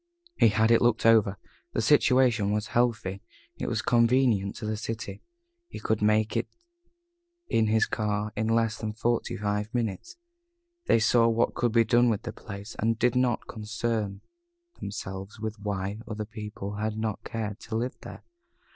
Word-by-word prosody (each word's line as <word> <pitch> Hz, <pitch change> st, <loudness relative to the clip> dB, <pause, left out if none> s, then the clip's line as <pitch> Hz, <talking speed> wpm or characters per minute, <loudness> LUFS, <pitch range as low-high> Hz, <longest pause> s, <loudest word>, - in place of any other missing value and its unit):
He -, -, +5 dB
had 110 Hz, +2 st, +3 dB
looked 115 Hz, -1 st, +3 dB
it -, -, +8 dB
over. 105 Hz, -3 st, +4 dB, 0.4 s
The -, -, 0 dB
situation 120 Hz, -6 st, +4 dB
was 105 Hz, 0 st, -1 dB
healthy. 110 Hz, -5 st, 0 dB, 0.4 s
It -, -, -3 dB
was -, -, -1 dB
convenient 115 Hz, -4 st, +3 dB
to 115 Hz, -, -6 dB
the 110 Hz, 0 st, -1 dB
city. 110 Hz, -2 st, -5 dB, 0.5 s
He -, -, -8 dB
could 110 Hz, -1 st, -1 dB
make 105 Hz, +1 st, +2 dB
it 115 Hz, -, 0 dB, 1.0 s
in 110 Hz, -1 st, +2 dB
his 110 Hz, 0 st, +3 dB
car 105 Hz, -1 st, -2 dB
in 110 Hz, +1 st, -1 dB
less 115 Hz, 0 st, +1 dB
than 110 Hz, -1 st, -3 dB
forty 120 Hz, +2 st, -1 dB
five 105 Hz, +1 st, -2 dB
minutes. 110 Hz, -, -3 dB, 0.7 s
They -, -, +5 dB
saw 115 Hz, +1 st, +4 dB
what 115 Hz, +1 st, +2 dB
could 120 Hz, -1 st, 0 dB
be 115 Hz, -1 st, +5 dB
done 120 Hz, +1 st, +4 dB
with 110 Hz, -1 st, -1 dB
the -, -, -5 dB
place, 100 Hz, +1 st, -9 dB
and 115 Hz, +1 st, +1 dB
did 120 Hz, +1 st, +2 dB
not 125 Hz, -2 st, +1 dB
concern 110 Hz, -2 st, -3 dB, 0.6 s
themselves 95 Hz, +1 st, -6 dB
with 110 Hz, 0 st, -4 dB
why 100 Hz, 0 st, -3 dB
other 110 Hz, -1 st, -4 dB
people 105 Hz, -2 st, -7 dB
had 110 Hz, 0 st, -2 dB
not 110 Hz, -2 st, -3 dB
cared 110 Hz, -3 st, -4 dB
to 110 Hz, -, -6 dB
live 120 Hz, +3 st, -2 dB
there. -, -, -10 dB
110 Hz, 165 wpm, -27 LUFS, 105-115 Hz, 1.0 s, it